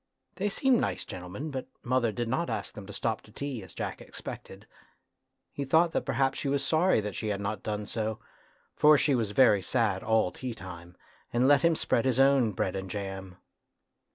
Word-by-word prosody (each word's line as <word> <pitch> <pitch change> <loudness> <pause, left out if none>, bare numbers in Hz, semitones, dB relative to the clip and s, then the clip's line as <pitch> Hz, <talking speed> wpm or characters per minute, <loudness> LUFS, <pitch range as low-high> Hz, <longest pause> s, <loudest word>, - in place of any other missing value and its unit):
They 205 +2 0
seemed 255 +4 +3
nice - - -2
gentle 90 0 -8
men, 140 - -5
but 130 -2 -4 0.2
mother 120 -2 +1
did 120 +3 -3
not 160 +9 -1
ask - - -3
them 100 -2 -9
to - - -8
stop 110 +2 -2
to 105 - -18
tea, 135 0 -5
as 95 -3 -11
Jack - - -4
expected. - - -9 0.9
He 140 - -3
thought 160 +5 +3
that - - -1
perhaps 135 -1 +1
she 140 - -2
was 140 0 0
sorry 160 -5 +3
that 105 -1 -4
she 110 - -3
had 100 -2 -1
not 100 +2 -3
done 105 -1 -3
so, 110 0 -2 0.6
for 150 0 +6
she 145 0 +2
was 115 -5 +1
very 105 -2 +5
sad 100 -1 0
all 110 -4 +2
tea 125 -3 -6
time, 90 -3 -10 0.3
and 120 +2 +3
let 145 -1 +6
him 170 +1 +4
spread 120 - +1
his 130 -1 +1
own 135 -4 +5
bread 95 +1 -1
and 95 -1 -4
jam. 95 -1 -6
115 Hz, 205 wpm, -29 LUFS, 100-140 Hz, 0.9 s, for